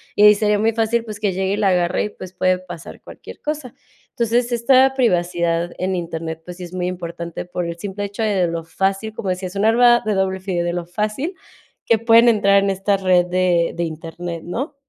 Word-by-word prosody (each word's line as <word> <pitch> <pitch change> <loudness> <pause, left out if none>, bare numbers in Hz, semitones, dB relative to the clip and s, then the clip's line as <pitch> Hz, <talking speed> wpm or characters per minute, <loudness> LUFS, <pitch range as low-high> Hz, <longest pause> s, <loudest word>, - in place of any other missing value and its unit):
y 205 - +4
ahí 210 0 +8
sería 210 0 +1
muy 225 +2 +2
fácil, 230 +1 0
pues, 215 -2 -7
que 205 -3 0
llegue 190 +1 -1
y - - -1
la 205 -2 +2
agarre 180 -1 +1
y, - - -4
pues, 185 -3 -11
puede 185 0 +1
pasar 175 -3 -10
cualquier - - -12
cosa. 295 -5 -4 0.4
Entonces, 235 +1 0
esta 255 +3 +4
privacidad 175 -7 +1
en 185 +1 -1
Internet, 165 -2 -5
pues, 180 0 -9
sí 185 - -8
es 175 - -12
muy 180 -1 -2
importante 170 -2 -6
por 180 0 -4
el 170 0 -5
simple 200 +3 -5
hecho 205 +3 -4
de 215 - +1
de 180 -2 +2
lo 165 0 -4
fácil, 195 +6 -2
como 200 -3 -4
decía, 185 +1 -2
es 180 - -11
un 200 - 0
arma 240 +1 +5
de 215 - +1
doble 190 0 0
filo, 185 -2 -2
de 175 - -1
lo 175 -1 -3
fácil, 215 - -3 0.5
que 230 - +3
pueden 230 +1 +6
entrar 200 -3 +4
en 200 - +1
esta 195 +1 0
red 185 -2 +3
de 180 -2 +1
de 170 - -2
Internet, 165 +1 -6
¿no? 265 - -4
190 Hz, 225 wpm, -20 LUFS, 175-220 Hz, 0.5 s, ahí